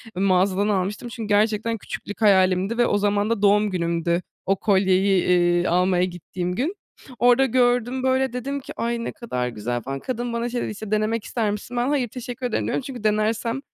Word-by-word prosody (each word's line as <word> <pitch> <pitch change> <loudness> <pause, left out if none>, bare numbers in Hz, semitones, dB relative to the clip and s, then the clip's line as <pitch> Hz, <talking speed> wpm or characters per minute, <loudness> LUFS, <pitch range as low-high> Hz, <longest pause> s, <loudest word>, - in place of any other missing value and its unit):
mağazadan 190 +1 +2
almıştım 205 +3 -1
çünkü 230 -2 -6
gerçekten 215 +2 +1
küçüklük 205 +1 -8
hayalimdi 190 +1 +3
ve 240 - +4
o 205 - +2
zaman 205 +1 +1
da 230 -3 0
doğum 210 +1 +4
günümdü 170 -1 0 0.2
o 195 - +2
kolyeyi, 190 -1 +2
iii, 175 0 +3
almaya 180 +1 +2
gittiğim 180 0 -4
gün. 300 - -1 0.4
Orada 245 +2 +5
gördüm 245 0 +1
böyle, 260 -1 +1
dedim 275 +3 -3
ki, 275 - -10
"Ay, 235 0 -2
ne - - -3
kadar 125 - -3
güzel" 120 +1 -3
falan. 135 +3 -5
Kadın 240 - -4
bana 235 +1 -2
şey 245 0 -2
dedi, - - -3
işte, 215 0 -8
"Denemek 215 +1 0
ister 220 -3 -1
misin?" 210 +4 -6
Ben, 240 +1 +1
"Hayır, 280 -4 +1
teşekkür 245 +1 -7
ederim." 240 - -1
diyorum. - - -1
Çünkü 255 -4 -8
denersem, 220 +3 0
210 Hz, 190 wpm, -23 LUFS, 185-240 Hz, 0.4 s, Orada